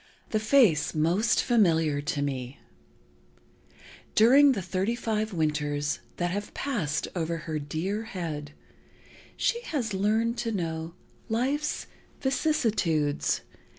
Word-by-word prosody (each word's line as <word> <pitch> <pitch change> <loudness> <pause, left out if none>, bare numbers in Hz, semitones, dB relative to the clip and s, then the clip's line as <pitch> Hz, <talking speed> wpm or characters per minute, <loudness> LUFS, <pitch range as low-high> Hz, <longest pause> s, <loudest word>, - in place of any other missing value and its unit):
"The 215 - +2
Face 215 - +4
Most 175 +9 +2
Familiar 165 - +3
to 145 -1 -2
Me. 130 -1 -4 1.6
During 270 +6 +7
the 200 - -3
thirty 190 +5 -1
five 220 -2 -1
winters 150 -3 -1 0.2
that 175 0 0
have 205 +2 -4
passed 195 - -1
over 165 -1 -1
her 155 -2 -2
dear 175 +9 -3
head, 160 -9 -5 0.8
she 470 - +1
has 255 - -2
learned 220 +4 +1
to 230 - -1
know 165 -4 -3 0.3
life's 270 +7 -1 0.3
vicissitudes. 220 - +1
190 Hz, 110 wpm, -27 LUFS, 155-230 Hz, 1.6 s, During